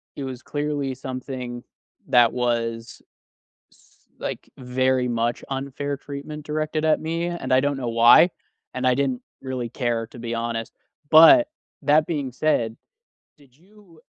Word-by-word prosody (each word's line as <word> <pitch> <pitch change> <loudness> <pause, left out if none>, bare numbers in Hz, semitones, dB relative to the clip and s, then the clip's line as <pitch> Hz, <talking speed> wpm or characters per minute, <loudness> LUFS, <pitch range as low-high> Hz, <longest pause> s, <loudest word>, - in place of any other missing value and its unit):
it 140 - -5
was 130 -1 -6
clearly 145 -2 -2
something, 125 -1 -6 0.4
that 120 -2 +5
was 115 -1 -2 0.7
s - - -28 0.2
like, - - -6
very 130 0 0
much 120 0 -1
unfair 140 +1 -4
treatment 145 +2 -8
directed 155 +1 -2
at 155 - +3
me, 165 +2 -2
and 175 -5 -4
I 130 - +6
don't 140 +1 0
know 125 -3 -3
why. 120 +9 +7 0.4
And 130 0 -3
I 125 - +4
didn't 130 -2 -1 0.2
really 130 -3 -4
care, 115 -2 -2
to 120 - -13
be 115 0 -4
honest. 115 -1 -3 0.4
But, 165 - +8 0.4
that 150 +2 +4
being 145 -6 -3
said, 120 -5 0 0.6
did 135 -3 -23
you 185 -2 -21
130 Hz, 145 wpm, -23 LUFS, 120-150 Hz, 0.7 s, But